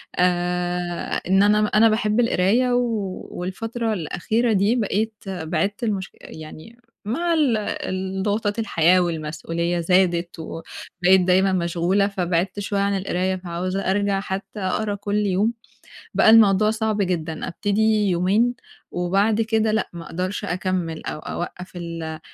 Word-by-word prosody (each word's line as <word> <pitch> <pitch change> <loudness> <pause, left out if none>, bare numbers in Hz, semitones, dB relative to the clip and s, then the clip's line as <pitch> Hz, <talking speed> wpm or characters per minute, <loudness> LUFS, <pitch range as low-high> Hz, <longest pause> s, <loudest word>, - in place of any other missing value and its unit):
آآ، 180 0 -1
إن 195 +2 +4
أنا 210 +1 +4
م 210 - +1
أنا 225 +1 +6
باحب 215 0 +1
القراية 235 +2 +2
و 225 -6 -1
والفترة 225 +5 -3
الأخيرة 215 +7 0
دي 200 +4 +3
بقيت 220 -1 0
بعِدت 185 +4 -2
المشك 200 -4 -2
يعني 160 +9 -11 0.3
مع 335 +10 0
ال 285 -8 +3
الضغوطات 205 +2 -2
الحياة، 180 -4 +3
والمسؤولية 165 +1 -2
زادت، 175 -1 +1
وبقيت 175 +3 0
دايمًا 185 +1 +3
مشغولة؛ 180 +4 +1
فبعدت 185 0 -1
شوية 200 0 -2
عن 200 0 +1
القراية، 190 0 -1
فعاوزة 185 +1 -3
أرجَع 200 0 +1
حتى 195 +2 -5
أقرا 205 +2 -1
كل 205 +1 -3
يوم، 200 +4 +1 0.6
بقى - - +5
الموضوع 215 -1 +6
صعب 220 -1 -1
جدًا، 165 -4 -2
أبتدي 210 +2 +1
يومين، 195 +7 +2 0.4
وبَعد 195 +5 +1
كده 220 -1 +1
لأ، 220 - 0
ما 170 -1 -8
أقدرش 185 +5 -3
أكمّل، 180 -3 -2
أو - - -4
أوقّف 180 +3 -6
ال 165 -2 -5
190 Hz, 130 wpm, -22 LUFS, 175-215 Hz, 0.6 s, أنا